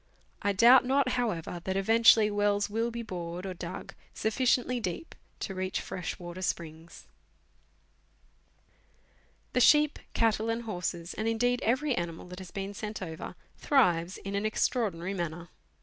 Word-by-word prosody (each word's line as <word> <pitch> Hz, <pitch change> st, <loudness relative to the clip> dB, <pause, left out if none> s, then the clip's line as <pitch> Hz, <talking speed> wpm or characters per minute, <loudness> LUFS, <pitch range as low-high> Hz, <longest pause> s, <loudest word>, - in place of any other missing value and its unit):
I 200 Hz, -, +1 dB
doubt 235 Hz, +6 st, +7 dB
not, 265 Hz, +1 st, +2 dB
however, 180 Hz, -9 st, -2 dB
that 190 Hz, 0 st, -1 dB
eventually 225 Hz, +1 st, +5 dB
wells 205 Hz, 0 st, +1 dB
will 225 Hz, +2 st, 0 dB
be 235 Hz, 0 st, -5 dB
bored 175 Hz, -2 st, -5 dB
or 190 Hz, -, -4 dB
dug 175 Hz, 0 st, -7 dB, 0.2 s
sufficiently 250 Hz, +2 st, +1 dB
deep 200 Hz, -, -5 dB, 0.3 s
to 195 Hz, -, -3 dB
reach 185 Hz, 0 st, -2 dB
fresh 180 Hz, -2 st, -5 dB
water 175 Hz, +1 st, -8 dB
springs. 165 Hz, -2 st, -5 dB, 2.5 s
The -, -, +2 dB
sheep, 300 Hz, +2 st, +5 dB, 0.2 s
cattle, 225 Hz, -1 st, +2 dB
and 230 Hz, +1 st, -1 dB
horses, 175 Hz, -5 st, -4 dB
and 220 Hz, -, -3 dB
indeed 245 Hz, +2 st, +1 dB
every 265 Hz, +5 st, +1 dB
animal 170 Hz, -5 st, -4 dB
that 180 Hz, +1 st, -8 dB
has 185 Hz, -2 st, -9 dB
been 195 Hz, +2 st, -5 dB
sent 210 Hz, +1 st, -5 dB
over, 160 Hz, -3 st, -7 dB, 0.2 s
thrives 180 Hz, -, +2 dB
in 195 Hz, -, -6 dB
an 200 Hz, +1 st, -1 dB
extraordinary 205 Hz, -5 st, 0 dB
manner. 170 Hz, -2 st, -4 dB
205 Hz, 145 wpm, -29 LUFS, 175-230 Hz, 2.5 s, doubt